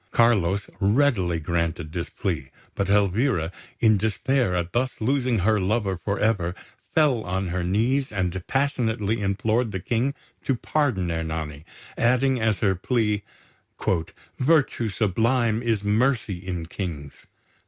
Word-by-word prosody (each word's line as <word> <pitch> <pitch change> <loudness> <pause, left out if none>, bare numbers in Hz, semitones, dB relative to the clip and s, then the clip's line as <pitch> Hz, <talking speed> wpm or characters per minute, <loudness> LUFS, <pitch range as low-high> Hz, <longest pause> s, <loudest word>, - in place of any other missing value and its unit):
Carlos 100 -5 +2
readily 100 - +2
granted 85 0 -2
this 85 0 -4
plea; 65 0 -3 0.2
but 100 -1 -2
Elvira, 100 - +2 0.3
in 110 -2 +5
despair 110 0 +1
at 90 0 -2
thus 130 +2 -1
losing 125 0 +1
her 105 +3 +2
lover 100 0 0
for 100 +3 -3
ever, 95 -5 +1 0.4
fell 145 -7 +4
on 95 -1 -2
her 90 0 -2
knees, 120 +9 +1
and 95 -2 -1
passionately 115 -6 0
implored 110 +4 +1
the 95 - -3
King 120 +9 0 0.3
to 135 - +1
pardon 120 - 0
Ernani, 80 -2 -4 0.4
adding 125 +1 +3
as 110 -2 +1
her 100 -3 +3
plea, 105 +2 0 1.2
"Virtue 135 -5 +2
sublime 115 +3 +1
is 115 -4 0
mercy 110 -2 +1
in 90 -3 -3
kings!" 80 -6 -6
105 Hz, 130 wpm, -25 LUFS, 90-120 Hz, 1.2 s, in